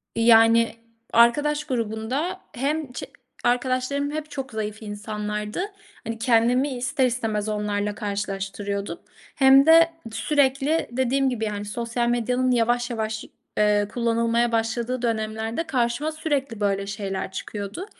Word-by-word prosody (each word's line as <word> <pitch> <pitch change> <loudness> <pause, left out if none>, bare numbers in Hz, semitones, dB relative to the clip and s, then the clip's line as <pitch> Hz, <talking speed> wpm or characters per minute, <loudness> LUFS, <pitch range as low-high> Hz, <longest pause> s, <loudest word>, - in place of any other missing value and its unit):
eee, 230 - +1
yani, 230 0 +6 0.4
arkadaş 295 +6 +4
grubunda 255 - -2
hem 285 +2 -2
çe - - -6 0.4
arkadaşlarım 255 +3 0
hep 310 0 -5
çok 270 -3 -5
zayıf 215 -1 -4
insanlardı. 210 +2 -4 0.4
Hani, 225 -1 -5
kendimi 245 +4 +3
ister 255 +2 +1
istemez 220 -4 -1
onlarla 210 -1 -1
karşılaştırıyordum 200 -2 -4 0.4
hem 270 0 +7
de 330 +1 +7 0.2
sürekli, 285 +4 +1
dediğim 260 +2 +1
gibi, 230 -3 -2
yani 205 -1 -3
sosyal 235 +3 -2
medyanın 250 +2 +1
yavaş 240 0 +2
yavaş, 220 -2 -3 0.3
eee, 210 -1 +3
kullanılmaya 235 0 +1
başladığı 230 +2 -1
dönemlerde 220 +3 -2
karşıma 260 +2 0
sürekli 285 -7 -2
böyle 200 -1 0
şeyler 195 -2 -4
çıkıyordu. 205 - -5
235 Hz, 120 wpm, -24 LUFS, 215-260 Hz, 0.4 s, hem